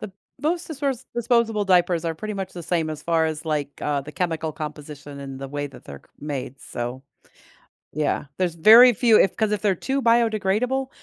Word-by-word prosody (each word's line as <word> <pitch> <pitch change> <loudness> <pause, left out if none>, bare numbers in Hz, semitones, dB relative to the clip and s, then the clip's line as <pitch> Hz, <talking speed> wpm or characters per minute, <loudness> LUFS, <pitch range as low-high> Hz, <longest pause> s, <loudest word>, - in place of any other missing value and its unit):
The 195 - -7 0.3
most 335 +3 -1
disperse 280 -5 -3
disposable 235 -3 +1
diapers 175 -2 +2
are 165 -1 -1
pretty 215 +5 -5
much 195 -1 -5
the 175 - -8
same 165 -1 -1
as 155 - -7
far 165 -1 +2
as, 155 0 -4
like, 150 -3 -3
uh, 145 -1 -1
the 150 +2 -10
chemical 165 -3 -2
composition 150 -2 -8
and 135 -1 -7
the 135 0 -6
way 145 +1 -3
that 140 - -14
they're 70 0 -10
c - - -29
made, 140 -2 -6
so 120 +2 -5 0.9
Yeah, 150 0 -1
there's 175 -3 -1
very 230 +8 +8
few 225 0 +4
if 190 - +3
'cause 220 -1 0
if 210 - -1
they're 200 -2 +2
too 270 +9 -2
biodegradable, 230 +2 +1
175 Hz, 195 wpm, -23 LUFS, 150-220 Hz, 0.9 s, very